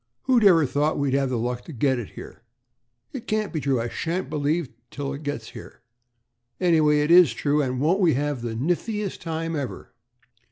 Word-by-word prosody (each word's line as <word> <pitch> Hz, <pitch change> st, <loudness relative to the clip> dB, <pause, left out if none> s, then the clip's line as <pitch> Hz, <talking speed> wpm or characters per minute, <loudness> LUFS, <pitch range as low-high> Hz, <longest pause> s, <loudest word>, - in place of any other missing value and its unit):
"Who'd 250 Hz, -4 st, +3 dB
ever 170 Hz, -6 st, +6 dB
thought 145 Hz, +3 st, 0 dB
we'd 140 Hz, -2 st, 0 dB
have 135 Hz, -1 st, +1 dB
the 125 Hz, -, -1 dB
luck 120 Hz, +1 st, -3 dB
to -, -, -9 dB
get 130 Hz, -1 st, +1 dB
it?" 115 Hz, -, -7 dB, 1.0 s
"It 260 Hz, -5 st, -7 dB
can't 215 Hz, -2 st, -1 dB
be 160 Hz, -, -1 dB
true. 135 Hz, -3 st, +1 dB
I 115 Hz, -, -2 dB
shan't 165 Hz, +3 st, -3 dB
believe 155 Hz, +2 st, 0 dB
it 125 Hz, -, -19 dB, 0.2 s
till 140 Hz, -1 st, -5 dB
it 140 Hz, -, -7 dB
gets 145 Hz, -7 st, -5 dB
here." -, -, -12 dB, 0.8 s
"Anyway, 155 Hz, -4 st, +3 dB
it 150 Hz, +2 st, +1 dB
is 175 Hz, -8 st, +7 dB
true, 145 Hz, +5 st, +1 dB
and 130 Hz, -2 st, -2 dB
won't 165 Hz, +8 st, +2 dB
we 170 Hz, -8 st, +3 dB
have 145 Hz, -2 st, -2 dB
the 115 Hz, -1 st, -4 dB
niftiest 185 Hz, -, -2 dB
time 165 Hz, 0 st, -3 dB
ever?" 140 Hz, -4 st, -6 dB
150 Hz, 195 wpm, -24 LUFS, 130-170 Hz, 1.0 s, is